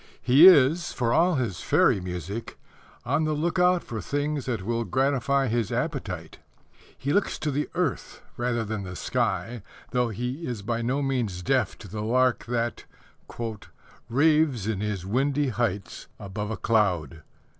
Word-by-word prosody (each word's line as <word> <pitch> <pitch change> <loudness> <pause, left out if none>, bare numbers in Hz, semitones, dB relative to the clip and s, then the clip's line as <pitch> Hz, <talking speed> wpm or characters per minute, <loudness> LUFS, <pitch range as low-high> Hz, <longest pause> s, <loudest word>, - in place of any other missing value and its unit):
He 135 +8 +7
is, 170 0 +5
for 120 -2 0
all 175 +1 +3
his 120 -10 -2
fairy - - +3
music, 90 +4 -6 0.5
on 160 - +1
the 155 - 0
look 170 +4 -1
out 180 0 +3
for 110 -3 -5
things 145 +2 -2
that 115 -7 -2
will 115 +1 -1
gratify 135 +2 +1
his 115 -3 -1
appetite. - - -4 0.6
He 140 +2 -2
looks 205 - +1
to 150 - -2
the 145 +2 -2
earth 175 -7 -2
rather 120 -2 -1
than 110 -1 -3
the 90 -1 -7
sky, 120 +4 -2 0.3
though 125 -1 +1
he 125 - -4
is 115 -5 -4
by 115 +2 -2
no 130 +5 0
means 120 -10 -2
deaf 125 -2 +1
to 105 - -11
the 105 +3 -5
lark 125 +3 +2
that 120 0 -2 1.2
Raves 145 -3 +3
in 110 -3 -1
his 105 -3 -3
windy 135 +6 +1
heights 110 -5 -3
above 105 +1 -5
a 110 - -3
cloud. 90 - 0
120 Hz, 155 wpm, -26 LUFS, 105-140 Hz, 1.2 s, He